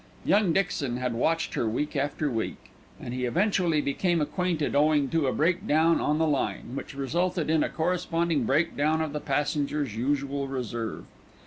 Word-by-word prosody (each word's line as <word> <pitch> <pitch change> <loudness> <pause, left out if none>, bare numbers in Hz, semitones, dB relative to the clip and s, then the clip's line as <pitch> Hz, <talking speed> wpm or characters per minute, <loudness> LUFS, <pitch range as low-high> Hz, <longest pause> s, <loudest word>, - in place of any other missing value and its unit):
Young 205 -3 +3
Dixon 150 -9 0
had 125 -1 -2
watched 165 +8 0
her 115 - 0
week 150 +8 -2
after 145 +2 -1
week, 115 -2 -4 0.3
and 120 - -6
he 125 0 -2
eventually 175 - +2
became 170 +5 0
acquainted 165 0 -1
owing 145 -1 +3
to 160 -2 +1
a - - +2
breakdown 165 0 +2
on 150 +1 +1
the 160 - +2
line, 145 -5 -1
which 140 - -6
resulted 170 +4 -1
in 160 -1 +3
a - - -1
corresponding 170 -3 0
breakdown 155 +3 +1
of 155 -2 -2
the 150 - -2
passengers' 145 -3 -1
usual 140 +3 -1
reserve. 120 -4 -4
150 Hz, 160 wpm, -27 LUFS, 135-165 Hz, 0.3 s, Young